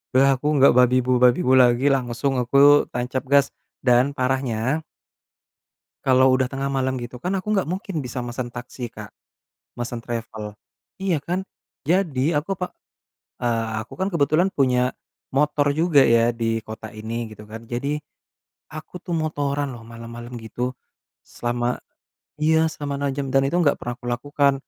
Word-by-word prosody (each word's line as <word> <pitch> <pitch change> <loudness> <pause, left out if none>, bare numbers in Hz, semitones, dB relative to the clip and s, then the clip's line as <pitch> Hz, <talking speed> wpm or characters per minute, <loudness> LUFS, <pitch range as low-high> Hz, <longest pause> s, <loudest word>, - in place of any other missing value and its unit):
Udah 135 +1 +5
aku 150 - -2
nggak 135 - +7
babibu-babibu 125 0 +4
lagi, 125 +2 +5
langsung 130 0 0
aku 140 +4 +5
tancap 125 +2 -2
gas. 140 -1 +5 0.3
Dan 125 +2 +4
parahnya 130 +2 0 1.2
kalau 130 0 +5
udah 130 -1 +1
tengah 135 +1 -2
malem 130 -1 -1
gitu 120 +1 -7
kan 180 - -1
aku 190 - -12
gak 190 - +1
mungkin 185 -3 -3
bisa 125 +1 -5
mesen 120 0 -4
taksi 125 0 -7
Kak, 105 -3 -10 0.7
mesen 120 -1 -4
travel, 110 -3 -6 0.4
iya 185 -5 0
kan? 185 +2 -2 0.4
Jadi 160 -5 +1
aku 175 +6 -1
pak 180 - -3 0.7
eee, 115 -2 0 0.2
aku - - -20
kan 190 - +1
kebetulan 165 +4 +3
punya 125 -2 +2 0.4
motor 145 0 +2
juga 160 -3 +4
ya 115 0 +4
di 115 -1 -1
kota 110 0 -8
ini 115 +2 -4
gitu 105 - -12
kan. 115 +1 -9
Jadi 140 +5 -2 0.8
aku 155 +3 -8
tuh 175 -1 -4
motoran 145 -3 -1
loh 115 -2 -10
malem-malem 115 +1 -9
gitu 125 +3 -4 0.5
selama 120 0 -2 0.6
iya, 160 +1 +4
selama 145 -2 -4
6 140 - +1
jam 140 -1 -2
dan 135 - +5
itu 175 - -1
gak 145 - +4
pernah 120 0 -4
kulakukan. 140 +3 +1
130 Hz, 150 wpm, -23 LUFS, 120-145 Hz, 1.2 s, nggak